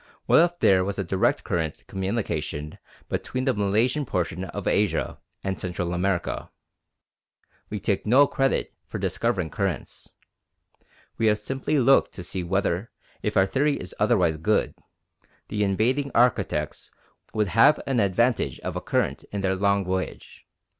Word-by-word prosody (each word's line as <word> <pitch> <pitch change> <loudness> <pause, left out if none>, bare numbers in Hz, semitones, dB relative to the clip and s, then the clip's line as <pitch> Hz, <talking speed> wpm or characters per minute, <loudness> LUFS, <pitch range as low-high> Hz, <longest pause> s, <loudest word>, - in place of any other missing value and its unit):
What - - +6
if 175 +1 +1
there 95 -1 +4
was 100 +1 -3
a 100 - -1
direct 95 +2 +1
current 80 -3 -2
communication 95 -6 -3 0.3
between 130 0 -3
the 130 - +3
Malaysian 110 +8 +1
portion 90 -5 -2
of - - -6
Asia 100 -6 0 0.2
and 95 -1 -2
Central 90 -1 -3
America? 90 0 -1 1.2
We 105 - -4
take 100 0 0
no 130 +6 +6
credit 135 -1 0
for - - -5
discovering 95 -9 -1
currents. 95 -4 -4 1.0
We 115 - +3
have 105 0 +4
simply 135 +7 -2
looked 135 +1 +4
to 90 - -7
see 90 +1 -4
whether, 95 +3 -1 0.3
if 105 -1 -1
our 95 - +6
theory 140 +8 +1
is 90 - -7
otherwise 95 -7 +3
good, 105 +8 +1 0.8
the 105 0 0
invading 120 +8 +1
architects 100 - +1 0.5
would 105 -2 +1
have 115 +10 +5
an 135 -3 +1
advantage 110 +5 +1
of - - -4
a - - -3
current - - -1
in 100 - -5
their 95 -1 +1
long 100 0 +1
voyage. 95 0 -5
100 Hz, 145 wpm, -25 LUFS, 95-120 Hz, 1.2 s, What